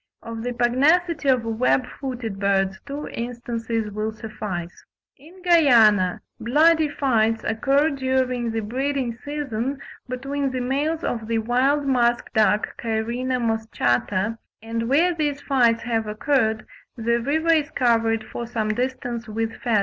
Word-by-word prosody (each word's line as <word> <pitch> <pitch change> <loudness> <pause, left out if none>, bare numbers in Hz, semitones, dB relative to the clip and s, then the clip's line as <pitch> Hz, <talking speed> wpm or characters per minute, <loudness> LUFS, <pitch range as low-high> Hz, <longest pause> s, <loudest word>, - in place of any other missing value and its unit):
Of 230 -1 -6
the 245 +2 -3
pugnacity 285 +6 +2
of 250 -3 +3
web 235 +3 +1
footed 245 -7 -6
birds, 195 -1 +1
two 285 +1 -5
instances 230 -2 -4
will 215 +1 -2
suffice: 210 -6 -6 0.3
in 340 +7 -17
Guiana 230 - +5 0.2
"bloody 310 +6 +4
fights 225 -6 +1
occur 275 +7 +2
during 260 -3 0
the 225 0 -2
breeding 260 +2 -2
season 275 -3 -3 0.3
between 275 +2 -2
the 260 -1 -3
males 290 +6 -1
of 225 -2 -3
the 230 0 0
wild 255 +6 +1
musk 240 -3 +1
duck 210 -1 +2
(Cairina 235 +3 -1
moschata); 220 - 0 0.2
and 230 +1 -3
where 335 +6 +3
these 295 -3 -1
fights 240 -5 +2
have 225 -2 -1
occurred 220 0 0 0.3
the 235 +1 +1
river 315 +7 +2
is 305 -2 +1
covered 230 -3 +1
for 235 +2 -6
some 220 -2 -2
distance 245 0 -3
with 225 +1 -3
feathers." 230 -4 +1
240 Hz, 135 wpm, -23 LUFS, 225-275 Hz, 0.3 s, Guiana